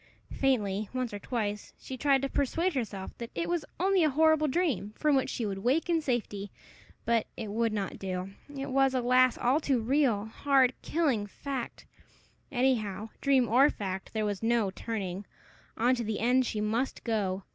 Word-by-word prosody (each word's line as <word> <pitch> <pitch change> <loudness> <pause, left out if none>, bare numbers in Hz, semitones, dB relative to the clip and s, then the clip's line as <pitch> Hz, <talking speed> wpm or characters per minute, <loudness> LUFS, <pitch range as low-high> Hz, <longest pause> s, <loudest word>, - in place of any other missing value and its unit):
Faintly, 215 -7 0
once 255 -4 -2
or 205 - -4
twice, 210 -2 -3
she 260 - -7
tried 275 0 +2
to - - +1
persuade 330 +7 0
herself 215 -7 -4
that 235 -1 -5
it 335 - -1
was 345 -2 0 0.2
only 380 0 +3
a 310 - +4
horrible 315 +1 +4
dream, 260 - -1
from 300 -2 +3
which 265 - +1
she 235 - -2
would 195 -2 -3
wake 270 - +1
in 330 -1 +2
safety; 220 -7 -2 0.6
but 230 -2 +2
it 220 -3 -5
would 230 +1 +1
not 205 -2 -3
do; 185 0 -4 0.3
it 270 0 -4
was, 270 0 +3
alas! 255 0 +4
all 260 +5 +2
too 275 -5 +1
real 235 -3 +2
hard, 260 +2 +2
killing 275 -11 0
fact! 265 +3 -6 0.7
Anyhow, 225 -6 0
dream 270 -3 +3
or 260 +6 +5
fact, 190 -5 -5
there 215 -1 -1
was 205 -2 -2
no 225 -3 +2
turning; 195 -3 -4 0.5
on 245 +3 +3
to 240 -2 -1
the 215 -1 -2
end 250 +2 +3
she 210 - -2
must 230 +5 -1
go. 200 -5 -1
240 Hz, 180 wpm, -29 LUFS, 210-275 Hz, 0.7 s, or